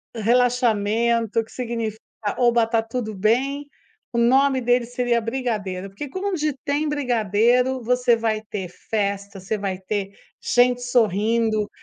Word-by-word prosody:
ah, 225 - -4
relaxamento, 230 -1 +2
que 220 - -19
significa: 230 -3 -4 0.4
"Oba, 240 -2 +4
está 225 0 +1
tudo 225 -1 -4
bem", 260 +8 0 0.5
o - - -1
nome 260 +3 +4
dele 245 0 +2
seria 245 -1 0
"brigadeiro", 215 -6 -3
porque 205 +9 -7
como 375 +7 -3
onde 305 -5 0
tem 290 +2 0
brigadeiro, 250 -1 +2
você 250 0 +3
vai 225 -1 -1
ter 190 -4 -4
festa, 200 0 -3
você 190 +4 -3
vai 195 -2 -3
ter 195 +1 -3 0.3
gente 245 0 +3
sorrindo, 225 -2 +1
230 Hz, 135 wpm, -23 LUFS, 215-250 Hz, 0.5 s, Oba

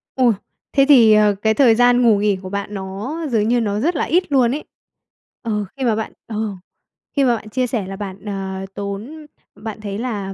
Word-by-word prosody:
Ôi, 250 -3 +4 0.4
thế 275 -1 +4
thì, 230 -6 +7
ờ, 210 -1 +4
cái 220 0 +3
thời 235 -1 +5
gian 245 +1 +4
ngủ 225 -4 +5
nghỉ 205 -1 +2
của 185 - -7
bạn 200 +1 -4
nó 195 +9 -5
dường 220 -5 +1
như 240 +1 +3
nó 205 -2 -1
rất 330 +9 0
là 295 - 0
ít 350 -2 +1
luôn 250 -4 +4
ấy. 305 - -5 0.8
Ừ, 210 -3 -1
khi 270 - -3
mà 225 - +2
bạn 220 - -4
ờ, 220 - -6 0.8
khi 280 - +3
mà 245 -2 +3
bạn 215 -1 -8
chia 255 +2 0
sẻ 220 -6 -2
là 195 - -6
bạn, 195 0 -7
ờ, 195 -1 -4
tốn 205 +10 -6 0.3
bạn 215 +1 -7
thấy 200 -1 -4
là 210 -6 -3
220 Hz, 215 wpm, -20 LUFS, 200-245 Hz, 0.8 s, thì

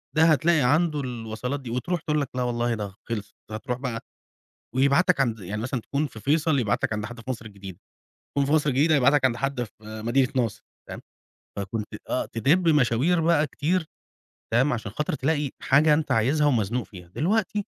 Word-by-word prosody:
ده 160 - +5
هتلاقي 160 0 +4
عنده 150 +4 +2
الوصلات 125 +1 -4
دي." 130 - -8
وتروح 155 +8 -2
تقول 150 -2 0
لك: 135 - -3
"لأ 125 - -1
والله، 120 -1 0
ده 105 -3 -5
خلص." 105 -2 -5 0.2
هتروح 125 +3 -3
بقى، 125 -4 -4 0.7
ويبعتك 140 +4 +3
عند، 115 -4 0
يعني 105 +3 -5
مثلًا 120 0 -2
تكون 145 +5 -2
في 110 - -12
فيصل، 150 +3 +2
يبعتك 110 -1 0
عند 105 0 -3
حد 120 0 -9
في 130 - -11
مصر 115 -3 -4
الجديدة. 100 -4 -10 0.6
تكون 140 -1 +2
في 145 - -2
مصر 150 -1 +3
الجديدة، 150 +4 +3
يبعتك 140 +1 +4
عند 120 -2 +1
حد 135 -2 -2
في 110 0 -10
مدينة 130 +2 +3
نصر. 115 -4 -1 0.2
تمام. - - -8 0.6
فكنت، 105 +2 -4
آه، - - 0
تدب 165 +9 +2
مشاوير 150 +4 +3
بقى 160 -2 +3
كتير، 165 +4 -1 0.7
تمام، 130 +5 +3
عشان 110 -4 -4
خاطر 150 +7 -2
تلاقي 145 0 0
حاجة 150 +3 +5
أنت 155 0 0
عايزها 140 +7 +2
ومزنوق 120 -2 +1
فيها. 90 -4 -12
دلوقتي، 205 - 0
130 Hz, 180 wpm, -25 LUFS, 115-150 Hz, 0.7 s, ده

